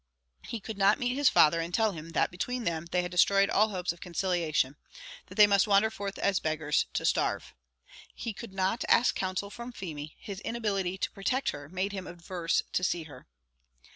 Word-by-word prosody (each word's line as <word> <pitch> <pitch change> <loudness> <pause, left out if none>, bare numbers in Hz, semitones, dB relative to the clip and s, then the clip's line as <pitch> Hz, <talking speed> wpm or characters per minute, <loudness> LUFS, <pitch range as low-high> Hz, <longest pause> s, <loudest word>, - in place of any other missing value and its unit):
He 230 - -6
could 215 0 -7
not 200 +2 +5
meet 245 0 -1
his 280 0 +4
father, 165 +2 +5
and 165 +1 -4
tell 220 +3 +2
him 165 -2 -8
that, - - +2
between 245 +7 -3
them, 170 -3 -2
they 180 +1 +1
had 180 - -5
destroyed 195 +2 +4
all 215 +2 +4
hopes 180 -4 -2
of 170 - -19
conciliation; 170 -6 0 0.5
that 185 - -12
they 210 - +8
must 200 -1 +3
wander 205 +2 +4
forth 200 -2 -5
as 195 -2 +1
beggars, 155 -1 0
to - - -1
starve. - - 0 0.6
He 230 - -4
could 230 +1 -9
not 190 +4 0
ask 240 - +5
counsel 190 +2 -3
from 240 +2 -7
Feemy; 155 -9 -7
his 200 -3 -7
inability 205 -5 -2
to - - -2
protect 255 +7 -1
her 145 0 -9
made 185 +3 -2
him 190 -2 -6
averse 170 0 -2
to 180 - 0
see 175 -2 0
her. 155 - -13
190 Hz, 200 wpm, -29 LUFS, 170-210 Hz, 0.6 s, they